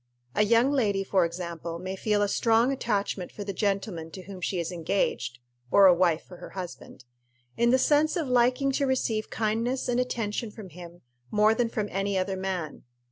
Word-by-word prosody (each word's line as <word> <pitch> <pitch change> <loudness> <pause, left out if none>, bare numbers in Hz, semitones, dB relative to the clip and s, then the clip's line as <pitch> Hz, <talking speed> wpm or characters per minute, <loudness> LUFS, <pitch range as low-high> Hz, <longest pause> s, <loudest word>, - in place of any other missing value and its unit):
A - - +2
young 230 +5 +4
lady, 205 -8 +1
for 190 -2 +2
example, 170 -1 -5
may 185 +2 -5
feel 205 +1 +1
a - - +2
strong 230 +4 +3
attachment 205 -7 -2
for 205 - -7
the 200 0 -4
gentleman 195 -4 -2
to 185 +3 -9
whom 190 -1 -9
she 180 +1 -1
is 170 0 -3
engaged 160 -8 -1 0.3
or 200 +7 +6
a 185 - +8
wife 170 -2 +2
for 180 - -13
her - - -10
husband 175 -7 -8 0.5
in 235 0 +3
the 255 - +5
sense 295 +3 +3
of 325 -5 -1
liking 250 +2 +3
to 275 +1 0
receive 230 -4 0
kindness 230 +4 -1
and 245 0 +1
attention 230 -3 -2
from 210 -2 -10
him 175 +1 -12 0.3
more 210 +1 +4
than 235 +1 0
from 215 -3 -2
any 195 +1 -1
other 190 +1 -1
man. 185 -5 -4
200 Hz, 190 wpm, -27 LUFS, 180-235 Hz, 0.5 s, a